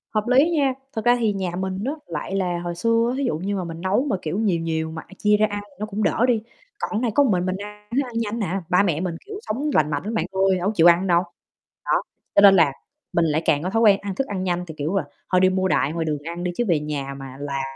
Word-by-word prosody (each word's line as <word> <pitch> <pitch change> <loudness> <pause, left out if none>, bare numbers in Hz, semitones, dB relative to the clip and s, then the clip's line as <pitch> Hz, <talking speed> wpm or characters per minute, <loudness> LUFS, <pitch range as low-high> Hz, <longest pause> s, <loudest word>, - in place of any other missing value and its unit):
Hợp 215 - +2
lý 270 +7 +5
nha, 280 -6 +2 0.2
thật 220 - -4
ra 245 0 +6
thì 220 -3 +1
nhà 190 -3 -2
mình 190 +1 -3
á, 270 - 0 0.2
lại 170 +4 -4
là 180 -3 0
hồi 175 0 -4
xưa, 230 +5 +2
thí 280 - -1
dụ 240 - 0
như 195 +5 -2
mà 185 - -2
mình 165 0 -7
nấu 200 +8 +1
mà, 205 - +1
kiểu, 160 +4 -3
nhiều 195 -6 +1
nhiều 160 -1 -2
mà, 160 0 -6
a, - - -15
chia 210 0 +3
ra 215 - +4
ăn 205 0 -4
thì 190 - -24
nó 215 - -2
cũng 215 0 -3
đỡ 230 - +2
đi. 230 -3 +2 0.4
Còn 215 - -2
này 240 -3 0
có 285 - +6
một 265 - +2
mình 180 -1 +1
mình 185 - -1
ăn 210 +1 -10
thức 280 - +3
ăn 240 -2 -6
nhanh 230 0 -2
nè, 195 -2 -1
ba 180 +2 +4
mẹ 170 -5 0
mình, 180 -2 -2
kiểu, 410 0 -7
sống 280 - -2
lành 150 -1 +3
mạnh 145 -1 -2
lắm 215 +3 -4
bạn 220 - 0
ơi, 190 0 +2
đâu 180 +1 -1
có - - +2
chịu 165 -1 +6
ăn 175 +3 0
đâu. 175 -1 +3 0.6
Đó, - - +2 0.3
cho - - +7
nên 200 -1 +8
là 165 -6 +5 0.4
mình 170 - +3
lại 155 0 +1
càng 145 +1 +2
có 185 - -1
thói 225 +3 +1
quen 205 -3 +6
ăn 200 -2 -4
thức 270 +6 -1
ăn 190 -2 -3
nhanh 180 -1 -1
thì, 160 - -7
kiểu 155 +6 -2
là, - - +1 0.3
thôi 185 -1 +4
đi 185 - +5
mua 185 0 +1
đại 155 -4 +1
ngoài 165 -1 -2
đường 150 -2 -1
ăn 170 +2 -5
đi 180 - -1
chứ 240 - +1
về 170 -5 +3
nhà 145 -2 -4
mà 135 - -8
làm 140 -1 -3
190 Hz, 300 wpm, -23 LUFS, 170-215 Hz, 0.6 s, nên